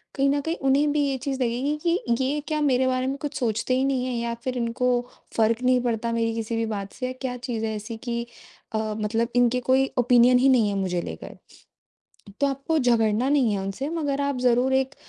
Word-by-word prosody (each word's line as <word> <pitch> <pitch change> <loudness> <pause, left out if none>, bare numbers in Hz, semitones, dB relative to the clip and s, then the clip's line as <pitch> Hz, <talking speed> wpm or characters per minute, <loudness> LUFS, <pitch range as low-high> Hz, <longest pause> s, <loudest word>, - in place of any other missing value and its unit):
कहीं 275 0 +2
न 285 +1 +2
कहीं 325 +3 -2
उन्हें 275 +2 +3
भी 300 0 +1
ये 270 -1 -1
चीज़ 270 0 -3
लगेगी 255 +5 0
कि 335 -9 +1
ये 285 +3 0
क्या 305 -1 -1
मेरे 260 -3 +2
बारे 255 0 0
में 270 - -1
कुछ 295 -1 -4
सोचते 230 0 0
ही 260 - +1
नहीं 260 -2 0
हैं 255 - -2
या 235 0 -2
फिर 255 -1 -2
इनको 235 +1 -1 0.5
फ़र्क 225 +2 +2
नहीं 250 0 +3
पड़ता 230 -1 -1
मेरी 230 0 0
किसी 225 0 -3
भी 225 0 0
बात 200 -3 -5
से 255 0 -4
क्या 255 -2 -3
चीज़ 235 -3 -3
है 220 - -2
ऐसी 215 +2 -6
कि 235 0 -3 0.5
अ, - - 0 0.2
मतलब 225 +2 -1
इनके 245 0 +3
कोई 260 +2 +3
ओपिनियन 245 0 +5
ही 270 +2 +4
नहीं 235 -5 +4
है 200 - -2
मुझे 185 -3 -1
लेकर। 80 - -8 1.0
तो 280 - +4
आपको 275 +4 -1
झगड़ना 235 -2 +2
नहीं 275 -6 +3
है 195 - -2
उनसे 195 +9 -4
मगर 290 -4 -1
आप 280 -2 -1
ज़रूर 250 +1 +3
एक 265 +1 0
250 Hz, 220 wpm, -25 LUFS, 230-270 Hz, 1.0 s, ओपिनियन